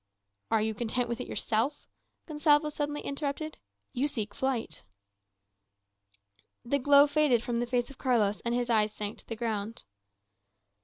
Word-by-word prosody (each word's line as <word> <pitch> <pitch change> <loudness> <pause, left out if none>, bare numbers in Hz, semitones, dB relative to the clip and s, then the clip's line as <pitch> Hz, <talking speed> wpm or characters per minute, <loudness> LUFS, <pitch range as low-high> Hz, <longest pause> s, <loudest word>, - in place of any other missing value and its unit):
"Are 225 -1 +2
you 220 0 0
content 240 +3 -1
with 235 - -3
it - - -6
yourself?" 230 +7 -1 0.4
Gonsalvo 300 -1 +3
suddenly 295 0 -3
interrupted. 290 +2 -4 0.3
"You 270 +2 +1
seek 215 -7 -4
flight." 235 -11 -2 1.8
The 280 +4 +1
glow 285 +2 +7
faded 290 -5 +2
from 240 -1 -1
the 240 - -1
face 245 +1 0
of 275 - -16
Carlos, 220 -5 +2
and 235 0 -1
his 245 0 0
eyes 215 -1 +3
sank 210 0 -5
to - - -16
the 225 - -3
ground. 220 -1 -3
245 Hz, 150 wpm, -29 LUFS, 225-285 Hz, 1.8 s, glow